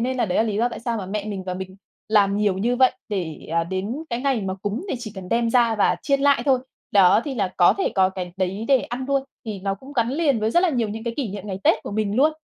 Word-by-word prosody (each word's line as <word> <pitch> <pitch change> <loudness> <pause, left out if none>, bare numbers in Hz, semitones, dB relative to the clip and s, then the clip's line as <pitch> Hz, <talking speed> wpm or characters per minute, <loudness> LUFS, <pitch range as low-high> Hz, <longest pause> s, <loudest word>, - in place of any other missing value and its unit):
nên 255 +2 -1
là 240 - +1
đấy 180 - -1
là - - +5
lý 215 -3 -2
do 235 +3 +2
tại 240 - -8
sao 230 -1 -2
mà 190 - -5
mẹ 205 +2 -3
mình 200 -3 -5
và 185 -1 -3
mình 190 0 -7 0.3
làm 200 -2 +3
nhiều 205 -3 +1
như 240 +5 +1
vậy 255 0 +5 0.2
để, 180 -7 -4
ờ, 165 0 +2
đến 190 +6 -3 0.2
cái 235 - -2
ngày 270 -3 +1
mà 190 -1 -3
cúng 210 - -3
để - - -1
chỉ 220 -4 -7
cần 190 -2 -8
đem 230 +1 +1
ra 235 -2 +3
và 210 - +2
chiên 275 -2 +1
lại 280 0 +4
thôi. 265 -2 +4 0.3
Đó 190 0 +6
thì 280 - -4
là 200 -6 0
có 175 - +5
thể 390 - +1
có 190 -1 +4
cái 180 -2 -6
đấy 190 +3 -2
để 270 -2 +5
ăn 245 +2 -5
luôn 275 -1 +2 0.2
thì 205 -3 -5
nó 195 0 -1
cũng 265 +8 -13
gắn 235 -4 +1
liền 285 -6 +1
với 215 +1 +1
rất 345 - +4
là 370 - +3
nhiều 240 -8 0
những 220 +2 -6
cái 235 -1 -3
kỷ 275 -6 -2
niệm 200 0 -7
ngày 190 -2 -4
Tết - - +3
của - - -6
mình 210 0 -1
luôn. 300 +5 +4
215 Hz, 300 wpm, -23 LUFS, 195-250 Hz, 0.3 s, Đó